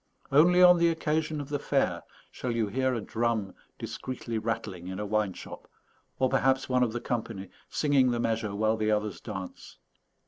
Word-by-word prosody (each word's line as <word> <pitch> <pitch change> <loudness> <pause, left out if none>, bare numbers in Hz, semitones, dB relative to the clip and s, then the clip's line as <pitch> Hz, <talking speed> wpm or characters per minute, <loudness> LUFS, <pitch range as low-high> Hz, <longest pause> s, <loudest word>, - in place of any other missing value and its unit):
Only 175 +6 +6
on 180 -1 +8
the 170 - +4
occasion 155 -1 -1
of 145 -1 -6
the 145 -1 -1
fair - - 0 0.3
shall 125 - -5
you 115 -2 +1
hear 130 +5 0
a 115 - -2
drum 110 -2 -1 0.2
discreetly 120 -3 -5
rattling 110 -5 -4
in 95 0 -5
a 105 - -2
wine 105 -2 0
shop - - -10 0.5
or 130 - +3
perhaps 135 +1 +2
one 125 -1 +2
of 120 -3 +2
the 120 - -3
company 110 -6 -4 0.2
singing 140 -4 +3
the 120 -1 0
measure 110 -3 -1
while 110 +2 +1
the 110 0 0
others 105 -2 -1
dance. 100 -5 -8
115 Hz, 180 wpm, -28 LUFS, 105-135 Hz, 0.5 s, on